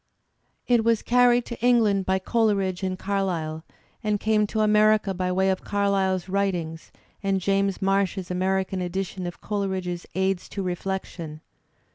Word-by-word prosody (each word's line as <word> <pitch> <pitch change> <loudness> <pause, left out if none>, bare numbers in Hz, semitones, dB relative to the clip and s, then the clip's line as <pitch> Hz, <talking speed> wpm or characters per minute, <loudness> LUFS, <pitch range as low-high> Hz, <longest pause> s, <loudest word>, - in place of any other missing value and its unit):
It 240 -2 +4
was 230 -1 +2
carried 245 0 +4
to 235 -1 -8
Eng 245 -1 +5
land 200 -3 +1
by 190 0 +3
Coleridge 195 -3 0
and 185 -1 -2
Carlyle, 180 -6 -2 0.4
and 210 -1 0
came 210 0 +2
to 220 +1 -1
America 215 -1 +4
by 180 0 -1
way 190 +1 +2
of 190 - -3
Carlyle's 195 -2 0
writings 180 -5 -2 0.3
and 195 -2 +1
James 195 +1 0
Marsh's 195 -1 0
American 190 +1 0
edition 185 0 -3
of 175 - -8
Coleridge's 190 -4 -3
"Aids 190 -1 0
to 200 - -4
Reflection." 175 -4 -4
195 Hz, 145 wpm, -25 LUFS, 185-210 Hz, 0.4 s, Eng